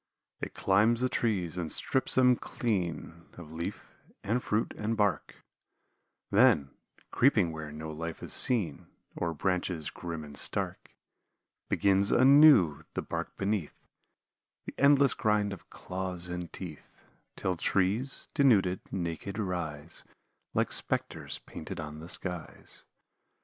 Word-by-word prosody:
It -, -, -6 dB
climbs 110 Hz, +5 st, +3 dB
the 130 Hz, -, +2 dB
trees 95 Hz, -9 st, -1 dB
and 85 Hz, -3 st, -3 dB
strips 130 Hz, -, +3 dB
them 125 Hz, -1 st, +5 dB
clean 85 Hz, -, -3 dB
Of 80 Hz, -3 st, -10 dB
leaf, 85 Hz, +5 st, -6 dB, 0.3 s
and 115 Hz, +5 st, 0 dB
fruit, 105 Hz, +2 st, -1 dB
and 110 Hz, +1 st, -2 dB
bark; 100 Hz, -7 st, 0 dB, 1.0 s
Then, 100 Hz, -, +4 dB, 0.4 s
creeping 110 Hz, -10 st, +3 dB
where 80 Hz, -1 st, -7 dB
no 80 Hz, +1 st, -7 dB
life 80 Hz, +1 st, -6 dB
is -, -, -2 dB
seen, 115 Hz, -9 st, +2 dB, 0.3 s
O'er 85 Hz, -1 st, -1 dB
branches 90 Hz, -1 st, -1 dB
grim 85 Hz, -3 st, -6 dB
and 75 Hz, -1 st, -10 dB
stark, -, -, -1 dB, 0.7 s
Begins 100 Hz, 0 st, +3 dB
anew, 130 Hz, -, +6 dB
the -, -, -2 dB
bark -, -, -5 dB
beneath, 100 Hz, -5 st, -2 dB, 0.9 s
The -, -, -7 dB
endless 140 Hz, -1 st, +5 dB
grind 105 Hz, -2 st, +1 dB
of 95 Hz, -, -12 dB
claws 90 Hz, -1 st, -5 dB
and 90 Hz, -1 st, -5 dB
teeth, 85 Hz, -6 st, -10 dB, 0.3 s
Till 95 Hz, -1 st, -1 dB
trees, 100 Hz, +10 st, 0 dB
denuded, 105 Hz, -10 st, +3 dB
naked 90 Hz, +2 st, -4 dB
rise 85 Hz, -6 st, -4 dB, 0.5 s
Like -, -, +1 dB
spectres -, -, -2 dB
painted 85 Hz, +3 st, -7 dB
on 75 Hz, -1 st, -6 dB
the 85 Hz, +2 st, -10 dB
skies. 90 Hz, -3 st, -3 dB
95 Hz, 125 wpm, -30 LUFS, 85-110 Hz, 1.0 s, anew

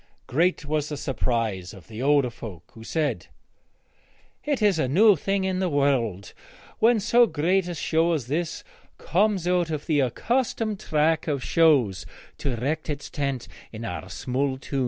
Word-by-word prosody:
Great 165 Hz, +4 st, +1 dB
was 150 Hz, 0 st, -1 dB
the 150 Hz, -, -4 dB
surprise 115 Hz, -9 st, -2 dB
of 95 Hz, -, -15 dB
the 110 Hz, +1 st, -7 dB
older 140 Hz, -2 st, +3 dB
folk, 95 Hz, -8 st, -10 dB
who 115 Hz, -, -12 dB
said, 155 Hz, +4 st, -2 dB, 1.2 s
'It 290 Hz, -3 st, 0 dB
is 205 Hz, -6 st, +3 dB
a 130 Hz, -, +1 dB
new 200 Hz, -, +6 dB
thing 195 Hz, +5 st, -1 dB
in 190 Hz, -1 st, -1 dB
the 185 Hz, -1 st, 0 dB
world 125 Hz, -, 0 dB, 0.5 s
when 230 Hz, 0 st, +4 dB
so 235 Hz, +3 st, +4 dB
great 175 Hz, +3 st, +1 dB
a 175 Hz, -, -4 dB
show 165 Hz, +2 st, +1 dB
as 145 Hz, -7 st, -2 dB
this 155 Hz, +5 st, -3 dB, 0.3 s
comes 195 Hz, -1 st, +1 dB
out 180 Hz, -2 st, +2 dB
of 155 Hz, -2 st, -4 dB
the 150 Hz, -3 st, +2 dB
accustomed 215 Hz, -, 0 dB
track 160 Hz, +2 st, +1 dB
of 140 Hz, -4 st, -1 dB
shows 140 Hz, -, +3 dB, 0.3 s
to -, -, -2 dB
erect 140 Hz, +7 st, -2 dB
its 145 Hz, -1 st, -5 dB
tent 140 Hz, -4 st, -2 dB, 0.2 s
in 115 Hz, +1 st, -7 dB
our 90 Hz, -2 st, -5 dB
small 130 Hz, +8 st, -2 dB
town!' 135 Hz, +1 st, -4 dB
150 Hz, 165 wpm, -25 LUFS, 125-180 Hz, 1.2 s, new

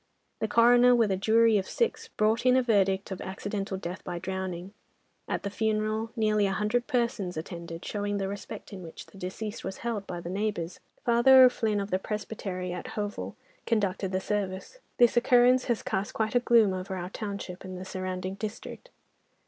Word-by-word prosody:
The 220 Hz, -, 0 dB
coroner, 245 Hz, +2 st, +6 dB
with 225 Hz, -4 st, +3 dB
a -, -, +2 dB
jury 220 Hz, +2 st, +4 dB
of 190 Hz, -, -5 dB
six, 470 Hz, -, -1 dB
brought 220 Hz, +2 st, +1 dB
in 255 Hz, 0 st, +5 dB
a 260 Hz, -, +3 dB
verdict 195 Hz, -4 st, +2 dB
of 190 Hz, -, -5 dB
'Accidental 195 Hz, 0 st, -4 dB
death 180 Hz, 0 st, -6 dB
by 175 Hz, -1 st, -4 dB
drowning.' 190 Hz, 0 st, -4 dB, 0.5 s
At -, -, -2 dB
the 200 Hz, -, -3 dB
funeral, 215 Hz, +1 st, 0 dB
nearly 215 Hz, -3 st, +2 dB
a 195 Hz, -, -1 dB
hundred 215 Hz, +4 st, 0 dB
persons 235 Hz, -, -1 dB
attended, 170 Hz, +1 st, -7 dB
showing 205 Hz, -1 st, -2 dB
the 195 Hz, -1 st, -1 dB
respect 205 Hz, +2 st, -7 dB
in 190 Hz, -, -7 dB
which 165 Hz, -2 st, -9 dB
the 195 Hz, -, -16 dB
deceased 205 Hz, +4 st, -5 dB
was 190 Hz, 0 st, -5 dB
held 215 Hz, -4 st, -2 dB
by 175 Hz, -, -5 dB
the 170 Hz, -, -8 dB
neighbours. 190 Hz, -2 st, -2 dB, 0.3 s
Father 260 Hz, +2 st, +7 dB
O'Flynn 220 Hz, -4 st, +3 dB
of 200 Hz, +1 st, -4 dB
the 185 Hz, -, +1 dB
Presbytery 190 Hz, -3 st, -4 dB
at 180 Hz, -, -6 dB
Hovell 205 Hz, -, -4 dB, 0.3 s
conducted 195 Hz, -4 st, 0 dB
the 185 Hz, -, 0 dB
service. 195 Hz, -, -3 dB, 0.2 s
This 240 Hz, -1 st, +5 dB
occurrence 245 Hz, +1 st, +5 dB
has 240 Hz, -3 st, -1 dB
cast 195 Hz, +2 st, -2 dB
quite 220 Hz, -1 st, 0 dB
a 245 Hz, -, +5 dB
gloom 230 Hz, -5 st, +4 dB
over 185 Hz, +1 st, -4 dB
our 180 Hz, +1 st, -5 dB
township 200 Hz, -4 st, -6 dB
and 185 Hz, -1 st, -7 dB
the 185 Hz, -, -7 dB
surrounding 185 Hz, 0 st, -4 dB
district." 215 Hz, -, -7 dB
205 Hz, 185 wpm, -28 LUFS, 185-225 Hz, 0.5 s, Father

